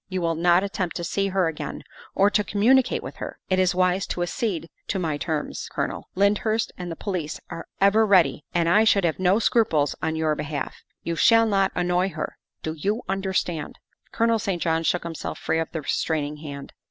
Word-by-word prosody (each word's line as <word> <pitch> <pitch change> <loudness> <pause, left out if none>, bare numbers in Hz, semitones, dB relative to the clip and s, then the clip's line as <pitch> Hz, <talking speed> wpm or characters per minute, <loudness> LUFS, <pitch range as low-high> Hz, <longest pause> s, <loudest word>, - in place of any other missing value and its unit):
You 185 -1 -2
will 165 -1 +1
not 175 +3 +3
attempt 190 -3 -3
to 175 - -3
see 195 +3 0
her 190 -2 +1
again 160 -2 -5 0.3
or 200 +1 +4
to 210 - +2
communicate 235 +6 +3
with - - -8
her. - - -6
It 185 - +3
is 185 -1 +2
wise 185 +1 +2
to 175 - -2
accede 175 -2 -2 0.2
to 200 - -1
my 165 -5 -1
terms, 155 0 -3
Colonel; - - -3
Lyndhurst 210 +3 +1
and 180 -1 -6
the - - -4
police 170 -5 -4
are 165 - -7
ever 200 +3 +5
ready, 185 -7 +4
and 170 -1 +1
I 205 +6 +5
should 205 -3 +4
have 170 0 0
no 185 +2 +4
scruples 210 -10 +2
on 160 - -1
your 160 -1 +1
behalf. 150 -2 -4 0.3
You 170 - -2
shall 225 +6 +5
not 195 -3 +2
annoy 180 +1 +1
her - - -5 0.2
do 160 - -2
you 205 +9 -1
understand?" 190 -5 -2 0.3
Colonel 230 0 +2
St. 195 -4 -2
John 165 -1 +1
shook 175 +2 0
himself 165 -2 -5
free 160 - -1
of 165 - -2
the 160 - -4
restraining 150 0 -1
hand. 140 -2 -8
180 Hz, 200 wpm, -24 LUFS, 160-200 Hz, 0.3 s, ever